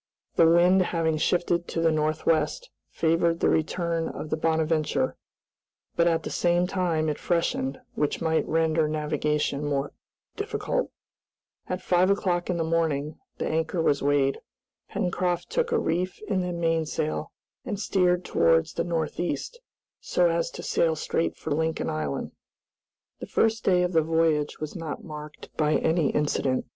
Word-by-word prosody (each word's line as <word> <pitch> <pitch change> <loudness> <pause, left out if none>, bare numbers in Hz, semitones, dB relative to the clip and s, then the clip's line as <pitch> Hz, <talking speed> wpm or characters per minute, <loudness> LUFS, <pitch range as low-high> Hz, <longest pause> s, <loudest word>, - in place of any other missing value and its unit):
The 165 - +6
wind 175 +3 +5
having 165 -3 0
shifted 175 +1 +1
to - - -3
the 165 0 +3
northwest 155 - 0 0.2
favored 165 +1 +1
the - - +3
return 165 +1 0
of 155 - -7
the - - +2
"Bonadventure," 160 -1 0 0.8
but 170 0 +3
at 165 -1 +1
the - - -5
same 175 0 +2
time 175 -4 0
it 150 - -2
freshened, 165 -5 -1
which 150 - -1
might 160 -1 +1
render 160 -1 +2
navigation 150 -1 -1
more 145 -1 -1 0.4
difficult. 430 +4 -2 0.8
At 185 0 -3
five 180 +1 +3
o'clock 180 -3 0
in 180 - 0
the 165 - 0
morning 160 -3 -1 0.2
the - - -2
anchor 160 +2 -1
was 145 -3 +2
weighed. 140 -1 +2 0.5
Pencroft 180 -2 -1
took 475 -1 0
a 465 - +3
reef 180 - -1
in 195 -3 0
the 180 0 -2
mainsail, 165 -2 -1 0.3
and 205 -4 -4
steered 180 -3 +1
towards 80 -1 +3
the - - -1
north 165 -3 -2
east, 480 - -3 0.4
so 175 -1 +2
as 165 0 0
to - - -9
sail 165 -1 +1
straight 165 +1 -1
for 160 - -6
Lincoln 160 +2 0
Island. 75 -2 -3 0.9
The - - -7
first 225 0 +1
day 180 -1 +3
of 180 0 -1
the 160 - +5
voyage 160 -2 +1
was 155 -1 -5
not 160 -4 -5
marked 150 -1 -10
by 155 -1 +2
any 160 -3 +2
incident. 140 -3 0
165 Hz, 155 wpm, -26 LUFS, 155-175 Hz, 0.9 s, The